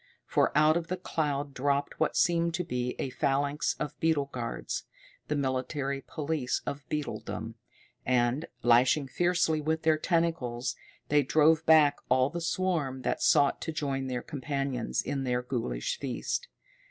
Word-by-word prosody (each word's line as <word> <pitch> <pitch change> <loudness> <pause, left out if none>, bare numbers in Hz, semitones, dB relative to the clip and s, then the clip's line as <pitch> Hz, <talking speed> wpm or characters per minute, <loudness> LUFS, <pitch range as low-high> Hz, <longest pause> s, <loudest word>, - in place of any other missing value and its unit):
For - - +2
out 155 +2 +5
of 170 -1 -3
the 185 - -2
cloud 145 -5 -2
dropped 140 +2 -1
what 160 - +1
seemed 170 0 +2
to 180 - -1
be 125 -6 -2
a 130 - -3
phalanx 140 +1 0
of 150 0 -4
beetle 145 -4 +1
guards, 120 -2 -4 0.4
the - - -1
military 135 0 -1
police 150 -3 -2
of 140 0 -4
beetledom, 150 -1 -4 0.5
and, 125 +4 +1 0.2
lashing 125 +4 +4
fiercely 175 -1 +1
with 160 +1 -1
their 160 -1 +3
tentacles, 150 -9 0 0.3
they 150 0 +5
drove 155 +3 +4
back 150 -3 +6
all 130 +2 +3
the 170 +1 -4
swarm 165 -7 -1
that - - -1
sought 145 -2 +4
to 160 - -3
join 135 -3 -2
their 125 -1 -3
companions 135 -4 -2
in 135 -1 -2
their 125 -1 0
ghoulish 130 - -2
feast. - - -3
145 Hz, 150 wpm, -29 LUFS, 130-160 Hz, 0.5 s, back